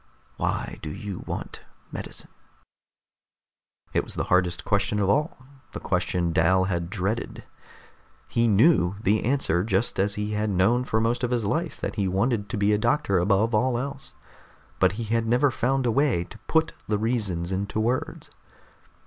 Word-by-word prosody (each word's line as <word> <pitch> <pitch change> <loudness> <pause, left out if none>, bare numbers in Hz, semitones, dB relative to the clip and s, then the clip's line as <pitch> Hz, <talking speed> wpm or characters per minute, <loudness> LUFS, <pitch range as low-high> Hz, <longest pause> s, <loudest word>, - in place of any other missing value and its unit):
Why - - -2
do - - -5
you 100 +4 -6
want - - -5 0.3
medicine?" - - -7 1.6
It - - +2
was - - -4
the - - -1
hardest 90 -1 +2
question 100 +1 +1
of 100 -1 +1
all, 150 +8 +1 0.4
the - - -5
question 85 -2 -1
Dal 95 +4 +3
had 85 -3 -2
dreaded. 105 +3 -3 0.8
He 115 0 +1
knew 100 - +4
the 105 +3 +2
answer, 115 -9 +1
just 100 0 0
as 100 +1 +1
he 105 0 -3
had 105 0 -1
known 110 +7 +2
for 110 - 0
most 115 +3 0
of 125 - +1
his 120 -3 0
life 160 +8 -2
that - - -4
he 100 -2 +1
wanted 105 +2 0
to - - -3
be 100 +1 +3
a 105 - +2
doctor 110 -5 +2
above 100 +5 +2
all 120 +3 +2
else. 135 +2 -6 0.6
But 95 0 +4
he 115 +3 -4
had 115 +1 0
never 125 +4 +3
found 130 +2 0
a 120 - +2
way 130 -8 +2
to 90 - -13
put 160 0 +2
the 105 - +1
reasons 105 -6 -1
into 100 +3 -2
words. 120 +4 -2
105 Hz, 170 wpm, -25 LUFS, 95-120 Hz, 1.6 s, knew